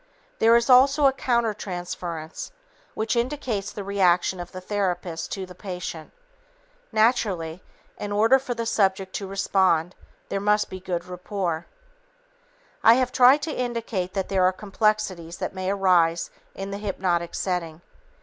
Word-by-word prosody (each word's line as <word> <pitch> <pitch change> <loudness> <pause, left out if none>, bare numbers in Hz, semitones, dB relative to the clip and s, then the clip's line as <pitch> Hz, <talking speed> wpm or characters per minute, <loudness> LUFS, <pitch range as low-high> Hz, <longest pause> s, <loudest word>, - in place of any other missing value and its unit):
There 230 +1 +6
is 235 0 +3
also 275 +3 +6
a 270 - +5
countertransference 180 -9 -3 0.5
which 220 +2 -1
indicates 235 -5 -2
the 205 - -6
reaction 185 -2 +2
of 175 - -7
the 185 - -7
therapist 180 -4 -3
to 190 -1 -4
the 180 - -12
patient. 180 -4 -7 0.8
Naturally, 200 -7 +1 0.4
in 205 - -4
order 225 +6 +4
for 250 -2 -4
the 230 0 -3
subject 190 -4 +1
to 195 - -6
respond, 190 -3 +1 0.4
there 195 - -1
must 210 +1 +1
be 185 - -6
good 180 -2 -3
rapport. 180 -2 -4 1.2
I 225 - +8
have 255 0 +1
tried 265 +4 +6
to 315 - -2
indicate 230 -7 -3
that 195 -1 -1
there 190 -2 +1
are 185 - +5
complexities 195 -4 -1
that - - -4
may 185 0 -3
arise 180 -4 +2 0.2
in 195 +1 -5
the 200 - -4
hypnotic 180 -4 -1
setting. 175 -3 -3
195 Hz, 145 wpm, -25 LUFS, 180-225 Hz, 1.2 s, I